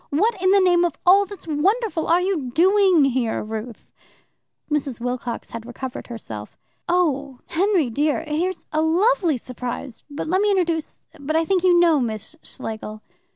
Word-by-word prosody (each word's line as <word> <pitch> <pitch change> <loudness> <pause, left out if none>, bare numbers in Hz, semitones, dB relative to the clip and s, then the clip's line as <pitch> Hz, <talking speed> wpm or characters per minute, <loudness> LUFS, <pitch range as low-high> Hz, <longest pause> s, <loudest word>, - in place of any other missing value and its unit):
"What 415 +11 +2
in 370 - +3
the 400 +1 +5
name 355 -2 +4
of 345 -4 0
all 390 +2 +6
that's 400 -3 -10
wonderful 375 +4 0
are 345 +2 +4
you 360 -9 -1
doing 370 -3 +5
here, 245 -4 0
Ruth?" 220 +1 -7 0.8
Mrs. 280 -5 -2
Wilcox 245 -1 -4
had 230 -1 -6
recovered 245 +2 -7
herself. 110 - -8 0.3
"Oh, 285 -7 0
Henry 355 - +1
dear! 295 +6 0
here's 335 +5 -2
a 310 - +2
lovely 345 - +2
surprise 250 0 -7
but 285 - -5
let 370 +4 +1
me 415 - +2
introduce 340 -5 -1 0.2
but 290 +3 -3
I 325 0 +2
think 370 +1 +1
you 355 -2 +5
know 335 -4 +4
Miss 220 +2 -4
Schlegel." 215 -3 -7
315 Hz, 160 wpm, -22 LUFS, 250-365 Hz, 0.8 s, all